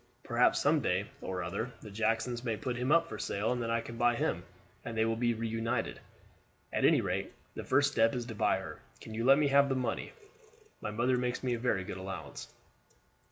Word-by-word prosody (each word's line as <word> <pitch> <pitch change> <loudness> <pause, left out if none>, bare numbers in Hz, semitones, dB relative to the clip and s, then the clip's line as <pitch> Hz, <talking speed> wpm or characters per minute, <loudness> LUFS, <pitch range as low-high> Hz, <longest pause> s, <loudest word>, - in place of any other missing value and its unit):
Perhaps 120 0 +3
some 150 +2 +3
day 95 -3 +1 0.2
or 90 -1 -3
other 110 +8 -3
the 105 - -9
Jacksons 115 +3 0
may 115 -3 -1
put 125 -1 -3
him 125 +3 -1
up 170 +1 +5
for 110 - -7
sale, 100 +2 -1
and 125 -1 -1
then 115 - -2
I 115 0 +1
can 115 0 -8
buy 120 0 +3
him, 90 -6 -1 0.4
and 115 -1 -5
they 110 - +3
will 115 0 +1
be 120 0 +1
reunited. 115 0 -2 0.7
At - - +2
any - - +5
rate, - - -2 0.2
the - - -6
first 145 0 +3
step 115 -3 +3
is 120 -1 -2
to 115 - -6
buy 105 - +2
her. 95 -5 -7 0.2
Can 110 - -9
you 115 +1 -2
let 135 +2 +7
me 150 -1 +3
have 140 0 +5
the 135 - +1
money? 125 -3 -2 0.7
My - - -3
mother 120 +4 +1
makes 125 0 -2
me 125 -2 +1
a 120 - -2
very 110 -6 +1
good 90 - -6
allowance." 95 0 -7
115 Hz, 220 wpm, -32 LUFS, 110-125 Hz, 0.7 s, let